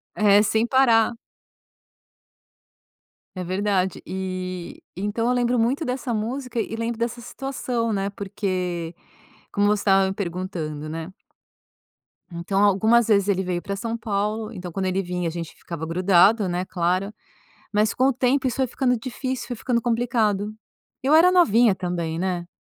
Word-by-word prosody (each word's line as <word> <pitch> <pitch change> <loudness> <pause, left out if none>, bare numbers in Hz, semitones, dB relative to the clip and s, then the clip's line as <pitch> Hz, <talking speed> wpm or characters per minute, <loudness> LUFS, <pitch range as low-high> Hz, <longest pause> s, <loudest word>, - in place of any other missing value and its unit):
É, 205 -1 +5
sem 220 +2 +1
parar. 240 -3 +4 2.2
É 185 - -3
verdade, 190 0 0
e 185 -1 -5
então 205 +4 -2
eu - - +3
lembro 245 0 +1
muito 250 +7 +1
dessa 250 -1 -3
música 245 +3 -3
e 225 - -3
lembro 230 0 -3
dessa 235 +1 -2
situação, 245 -2 -3
né, 195 -1 -1
porque 185 -4 -3 0.6
como 205 0 +2
você 210 -1 +2
estava 195 -1 +4
me 190 - -2
perguntando, 170 -6 -4
né. 165 +3 -6 1.2
Então 185 +4 -1
algumas 220 +4 +4
vezes 200 -2 +3
ele 190 -1 +2
veio 180 -1 -2
pra 200 - -4
São 230 +3 -3
Paulo 215 0 -2
então 180 -4 -7
quando 190 +2 -2
ele 185 +1 0
vinha 180 -1 -2
a - - -4
gente 165 -1 -6
ficava 165 -2 -6
grudado, 185 +4 +4
né, 175 +1 -1
claro. 185 +3 -1 0.6
Mas 210 0 +2
com 255 - +2
o 275 - +3
tempo 260 +2 +1
isso 250 - -1
foi 265 -1 +1
ficando 250 -1 0
difícil, 255 +1 -4
foi 245 - -4
ficando 235 +1 0
complicado, 225 -3 0 0.5
eu 275 +4 +3
era 340 +3 +7
novinha 235 - +5
também, 170 -3 -3
né. 180 -2 -2
205 Hz, 155 wpm, -23 LUFS, 185-235 Hz, 2.2 s, era